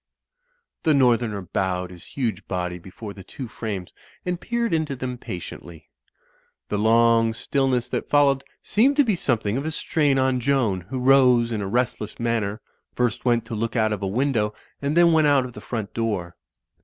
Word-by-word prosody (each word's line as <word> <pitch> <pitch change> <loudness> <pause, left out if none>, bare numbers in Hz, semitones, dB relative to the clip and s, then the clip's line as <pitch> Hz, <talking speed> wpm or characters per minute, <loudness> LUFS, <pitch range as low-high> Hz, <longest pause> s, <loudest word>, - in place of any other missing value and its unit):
The 155 -2 +3
northerner 120 -6 +2
bowed 90 0 -2
his 90 -1 -12
huge 120 -5 -2
body 90 -1 -3
before 95 +4 -9
the 95 - -11
two 125 +7 -8
frames 105 -5 -5 0.3
and 180 -1 -2
peered 235 -3 -1
into 155 -3 0
them 125 -1 -5
patiently. 85 -4 -8 0.8
The 105 - -1
long 115 +1 +4
still 135 +4 0
ness 125 -2 +1
that - - -3
followed 140 -2 +4 0.2
seemed 260 +7 +3
to 290 - +5
be 220 -6 +1
something 115 -8 0
of 140 - -3
a - - 0
strain 150 -3 +1
on 130 -1 +2
Joan, 120 -7 +1
who 130 - -3
rose 125 -2 +5
in 110 -2 -2
a 100 - -3
restless 120 -1 -2
manner, 115 -3 -1 0.3
first 120 -1 -1
went 120 -2 +2
to 115 - -7
look 115 +2 -2
out 110 -2 +2
of 105 - -4
a 100 - -1
window 110 -1 0 0.3
and 145 +3 -1
then 170 -1 +6
went 155 -1 +4
out 140 -3 +4
of 125 - -8
the - - -10
front 110 -4 -5
door. 100 -7 -2
120 Hz, 185 wpm, -24 LUFS, 105-135 Hz, 0.8 s, then